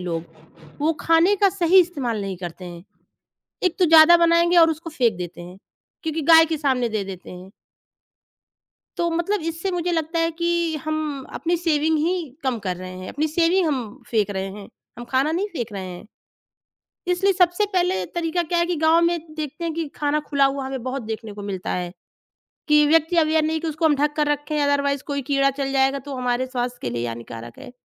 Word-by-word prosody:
लोग 170 -2 -3 0.6
वो 315 +2 +2
खाने 330 +5 +4
का 400 0 +4
सही 370 -1 +4
इस्तेमाल 275 - -2
नहीं 195 -1 -4
करते 175 +1 -8
हैं। 175 -1 -9 0.8
एक 365 - +1
तो 360 - +5
ज़्यादा 325 +2 +8
बनाएँगे 340 +1 +3
और 330 -1 +7
उसको 320 +1 -4
फेंक 240 - +1
देते 175 -1 -7
हैं 180 +2 -11 0.5
क्योंकि 320 0 -2
गाय 325 0 +9
के 320 -1 -2
सामने 260 -5 0
दे 215 -2 -2
देते 190 -2 -9
हैं। 185 +2 -11 1.5
तो 340 0 +1
मतलब, 345 +3 -1
इससे 330 +4 -3
मुझे 355 0 -1
लगता 325 0 -1
है 330 0 +1
कि 340 -1 -1
हम 305 -3 -3
अपनी 345 +1 -1
सेविंग 320 -2 +1
ही 335 +4 +1 0.3
कम 260 -3 0
कर 180 -1 -1
रहे 185 0 -8
हैं। 185 - -7
अपनी 305 +2 -1
सेविंग 340 +3 +2
हम 250 -8 -4
फेंक 215 -3 +1
रहे 190 0 -3
हैं। 200 0 -10 0.3
हम 240 - -7
खाना 270 +4 +1
नहीं 380 +5 -1
फेंक 240 -6 -4
रहे 190 -1 -5
हैं। 180 +1 -9 1.0
इसलिए 385 +2 +2
सबसे 360 +2 +2
पहले 350 - +1
तरीका 340 +1 0
क्या 340 +1 -1
है 340 - +2
कि 350 -1 -1
गाँव 320 +2 +3
में 340 0 +2 0.2
देखते 310 +2 -5
हैं 330 -2 -2
कि 330 -2 -3
खाना 295 0 0
खुला 280 -1 +3
हुआ 275 0 -1
हमें 265 -2 -5
बहुत 260 +1 -3
देखने 220 -1 -6
को 205 - -9
मिलता 190 -2 -4
है 175 -1 -3 0.8
कि 300 0 +5
व्यक्ति 325 +3 +3
अवेयर 315 -1 +3
नहीं 315 0 -1
कि 330 - -3
उसको 315 +1 -3
हम 300 - +4
ढँक 295 +1 +1
कर 300 -1 +1
रखें। 295 +1 -1
अदरवाइज़ 280 -1 +1
कोई 280 -2 -3
कीड़ा 275 -1 +3
चल 270 0 -1
जाएगा 270 +1 +2
तो 280 - -4
हमारे 250 0 -1
स्वास्थ्य 245 -1 -3
के 120 - -2
लिए 120 0 -3
हानिकारक 115 0 -8
है। - - -11
300 Hz, 205 wpm, -22 LUFS, 235-330 Hz, 1.5 s, गाय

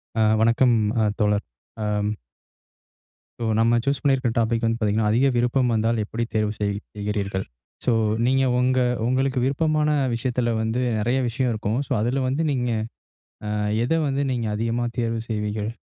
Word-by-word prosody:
ஆ 110 - +1 0.2
வணக்கம் 115 +2 +4 0.3
அ - - +3 0.2
தோழர். 105 -1 +1 0.4
அம் 105 0 0 1.3
ஸோ. - - -1
நம்ம 115 +1 +4
சூஸ் 140 -1 +1
பண்ணியிருக்கிற 135 -4 +2
டாப்பிக் 115 0 +1
வந்து 115 0 +1
பார்த்தீங்கன்னா, 105 0 +1
அதிக 120 +5 +3
விருப்பம் 125 +1 +2
வந்தால் 115 0 +1
எப்படி 115 +3 -3
தேர்வு 105 -1 +1
செய் 100 -1 0 0.2
செய்கிறீர்கள்? 100 -2 -2 0.4
ஸோ, 125 - +3 0.3
நீங்க 135 +2 +3 0.2
உங்க 130 +1 +2 0.3
உங்களுக்கு 130 +1 +1
விருப்பமான 150 +3 +1 0.3
விஷயத்துல 120 0 -1
வந்து 110 +2 -1 0.2
நிறைய 120 +5 +1
விஷயம் 125 +1 0
இருக்கும். 110 +2 -1
ஸோ, - - -15
அதுல 125 +5 0
வந்து 140 +5 0
நீங்க 125 -3 -1 0.8
அ - - -2 0.3
எத 125 - 0
வந்து 135 0 0
நீங்க 120 -3 -1
அதிகமா 115 +2 -1
தேர்வு 115 -1 -1
செய்வீர்கள்? 105 -1 -2
115 Hz, 150 wpm, -23 LUFS, 110-130 Hz, 1.3 s, வணக்கம்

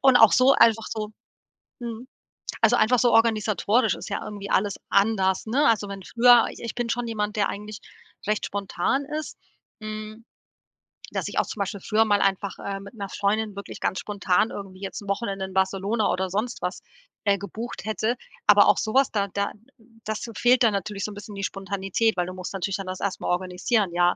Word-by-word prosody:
und 265 -2 +6
auch 225 -3 +7
so 255 +2 +6
einfach 225 -4 +4
so 215 -1 -4 0.7
mhm. 235 0 -6 0.6
Also, - - +5
einfach 220 +4 +4
so 245 0 +3
organisatorisch 225 +1 +3
ist - - -8
ja - - -2
irgendwie 200 -1 -7
alles 200 0 +1
anders, 195 -2 +2
ne? 280 +7 +3
Also, 210 -3 +2
wenn 195 -1 -6
früher 240 +3 +5
ich - - -10
ich 230 - -5
bin 240 -1 -2
schon 240 +1 -1
jemand, 210 -2 -2
der 205 -2 +1
eigentlich 210 +1 -7 0.5
recht 210 0 0
spontan 200 +7 -1 0.2
ist, 310 - -8 0.5
hm, 215 +1 -7 0.9
dass - - -2
ich - - -6
auch - - +3
zum - - -8
Beispiel 200 0 -3
früher 220 +4 +2
mal 205 -2 +2
einfach, 195 0 0
äh, 195 0 -5
mit 200 +3 -11
'ner 200 -4 -6
Freundin 210 +1 -1
wirklich 200 - -8
ganz 190 - 0
spontan 205 0 +1
irgendwie 190 -2 -8
jetzt 195 +1 -5
'n 200 - -10
Wochenende 200 -1 -2
in 190 - -9
Barcelona 195 +3 +1
oder 185 +1 -1
sonst 215 +6 -2
was, 180 +1 -3 0.4
äh, 200 -1 +3
gebucht, 220 +4 -7
hätte. 220 +3 0 0.3
Aber 205 0 +8
auch - - +5
so 220 - -2
was 270 0 +4
da 200 -2 0
da 200 +1 -2 0.5
das 215 0 -3
fehlt 245 +1 +4
dann 220 -3 +4
natürlich 200 +1 -3
so 210 - -3
'n - - -10
bisschen 205 0 -9
die 195 - -5
Spontanität, 195 +3 -1
weil 175 - +1
du 185 - -6
musst 185 +1 -7
natürlich 195 0 -2
dann 195 -1 -7
das 185 0 -5
erst 200 -1 -2
mal - - -4
organisieren, 185 +3 0
ja? 175 +1 +3
205 Hz, 205 wpm, -25 LUFS, 195-225 Hz, 0.9 s, Aber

